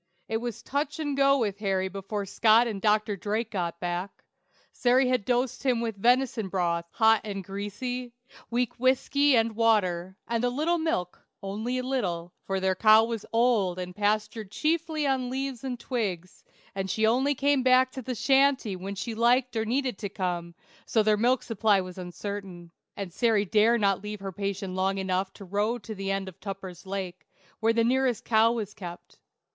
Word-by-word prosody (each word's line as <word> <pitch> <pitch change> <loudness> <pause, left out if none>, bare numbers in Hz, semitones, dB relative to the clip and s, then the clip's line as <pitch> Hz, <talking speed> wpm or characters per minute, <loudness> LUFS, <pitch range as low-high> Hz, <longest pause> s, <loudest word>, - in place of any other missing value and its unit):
It 225 - -1
was 235 -1 -5
touch 290 +2 -2
and 290 -3 -2
go 275 0 +4
with 205 -5 -1
Harry 190 -2 0
before 195 +1 -4
Scott 220 +4 +4
and 210 -4 -4
Dr. 210 0 +2
Drake 215 +4 -2
got 170 -4 -3
back. 175 +2 -4 0.5
Sary 250 +1 +3
had 250 -5 +1
dosed 250 0 0
him 255 -3 +1
with 230 -2 -2
venison 245 -3 +2
broth, 170 -2 0
hot 220 +2 +4
and 200 -2 -5
greasy, 205 +6 -5 0.4
weak 240 0 -1
whiskey 265 +2 +3
and 225 -1 +1
water, 190 -5 +1
and 235 0 -1
a 245 - +3
little 315 +7 0
milk 180 - -2 0.2
(only 215 +6 -3
a 255 - -2
little), 180 -10 -2
for 195 0 0
their 190 0 +1
cow 215 +3 +6
was 230 -2 -4
old 225 -6 +2
and 180 0 -6
pastured 210 0 -1
chiefly 315 - -1
on 260 -2 0
leaves 265 -1 -4
and 250 -3 -4
twigs, 190 -9 -4 0.3
and 195 0 -3
she 220 +2 +1
only 260 +6 +2
came 280 0 +2
back 255 0 +4
to 260 - -6
the 255 +1 -4
shanty 270 -4 +3
when 195 +2 -6
she 225 +4 -4
liked 245 +3 +2
or 220 0 0
needed 250 -2 -1
to 200 - -4
come, 175 -3 -3 0.3
so 220 - +2
their 215 0 +4
milk 245 +4 +2
supply 215 -3 +2
was 185 0 -6
uncertain, 180 -1 -7 0.3
and 195 -4 -5
Sary 220 -2 +2
dared 220 +4 +3
not 195 -2 +2
leave 210 0 -6
her 195 -1 -4
patient 195 0 -4
long 190 +1 0
enough 190 0 -1
to 200 - -11
row 205 +5 0
to 220 -1 -8
the 195 -1 -4
end 195 0 -1
of 190 0 -10
Tupper's 195 -2 -8
Lake, 190 -2 -5 0.3
where 225 +1 +3
the 230 0 +2
nearest 250 -1 +1
cow 225 0 +4
was 215 -4 -3
kept. 175 -3 -10
215 Hz, 185 wpm, -27 LUFS, 195-245 Hz, 0.5 s, cow